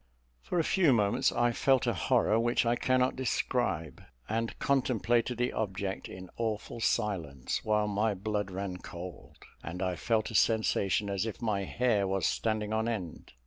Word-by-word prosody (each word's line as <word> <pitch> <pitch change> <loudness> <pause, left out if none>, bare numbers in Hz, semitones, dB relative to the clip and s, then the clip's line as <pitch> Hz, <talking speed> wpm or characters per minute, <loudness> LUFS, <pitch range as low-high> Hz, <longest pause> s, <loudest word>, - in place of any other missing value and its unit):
For 180 - -3
a 165 - +3
few 170 -5 +4
moments, 105 -3 +2
I 120 0 +2
felt 130 +2 +2
a 120 - +1
horror 105 +4 +2
which 120 +1 +2
I 120 +1 +3
cannot 130 +1 +2
describe, 120 - -1 0.3
and 115 +1 -2
contemplated 125 -3 +1
the 125 +1 0
object 100 -2 -3
in 95 0 -9
awful 110 0 -3
silence; 85 - -1
while 105 -1 +1
my 105 +1 +1
blood 105 +1 -2
ran 95 -1 -4
cold, 90 -1 -9 0.3
and 85 +3 -6
I 90 -1 -1
felt 110 +4 0
a - - -8
sensation 105 -2 +2
as 100 +2 -1
if 110 - -5
my 105 -4 -1
hair 110 -3 +1
was 95 -2 0
standing 110 -1 0
on 110 +1 0
end. 95 - -5
110 Hz, 165 wpm, -30 LUFS, 95-120 Hz, 0.3 s, few